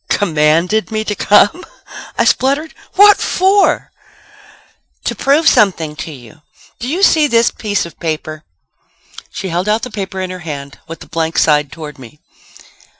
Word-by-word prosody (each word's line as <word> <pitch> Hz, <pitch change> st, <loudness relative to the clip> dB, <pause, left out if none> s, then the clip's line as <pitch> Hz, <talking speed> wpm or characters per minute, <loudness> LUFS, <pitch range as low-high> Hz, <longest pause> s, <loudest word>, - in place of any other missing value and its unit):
"Commanded 170 Hz, +3 st, +1 dB
me 215 Hz, -1 st, -2 dB
to 210 Hz, -, -3 dB
come!" 205 Hz, -, +3 dB, 0.5 s
I -, -, +2 dB
spluttered. 280 Hz, +4 st, +1 dB, 0.2 s
"What 410 Hz, +1 st, +7 dB
for?" 385 Hz, +2 st, +1 dB, 1.1 s
"To -, -, -2 dB
prove 295 Hz, +4 st, +2 dB
something 165 Hz, -7 st, +2 dB
to 160 Hz, -, -6 dB
you. 145 Hz, +3 st, -14 dB, 0.4 s
Do 240 Hz, -, -5 dB
you 345 Hz, +8 st, -2 dB
see 310 Hz, -6 st, +4 dB
this 235 Hz, -3 st, +2 dB
piece 205 Hz, -4 st, -2 dB
of 170 Hz, -, -13 dB
paper?" 155 Hz, -1 st, -4 dB, 0.9 s
She 190 Hz, -, -6 dB
held 180 Hz, +4 st, -2 dB
out 215 Hz, +2 st, 0 dB
the 250 Hz, -, -5 dB
paper 195 Hz, -2 st, -5 dB
in 185 Hz, -1 st, -4 dB
her 185 Hz, -, -7 dB
hand 140 Hz, -4 st, -8 dB
with 165 Hz, 0 st, -9 dB
the -, -, -11 dB
blank 165 Hz, 0 st, -3 dB
side 150 Hz, -2 st, +2 dB
toward 150 Hz, -3 st, -9 dB
me. 130 Hz, +4 st, -14 dB
190 Hz, 155 wpm, -15 LUFS, 155-235 Hz, 1.1 s, What